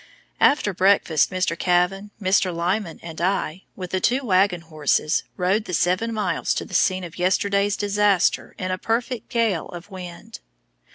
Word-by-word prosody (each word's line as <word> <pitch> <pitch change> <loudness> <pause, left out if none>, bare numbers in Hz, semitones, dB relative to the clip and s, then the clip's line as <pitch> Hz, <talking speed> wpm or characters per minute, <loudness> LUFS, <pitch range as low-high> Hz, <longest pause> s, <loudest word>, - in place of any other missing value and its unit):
After 245 -8 +3
breakfast, 185 -4 +3
Mr. 185 -3 -1
Kavan, 180 +3 +1
Mr. 190 -2 +2
Lyman, 175 +2 -2
and 165 -1 -7
I, 185 -1 -1
with 180 -2 -7
the 185 - 0
two 255 +7 +1
wagon 185 -3 +2
horses, 155 -1 0 0.2
rode 195 +4 +1
the 180 - -2
seven 185 +8 +1
miles 205 -6 -1
to - - -3
the - - -13
scene 185 -1 +2
of 170 0 -9
yesterday's 200 +2 +1
disaster 205 -2 +1
in 185 0 -3
a 185 - -2
perfect 230 +1 -2
gale 225 -9 0
of 180 +4 -10
wind. 180 -2 -9
185 Hz, 160 wpm, -23 LUFS, 175-205 Hz, 0.2 s, After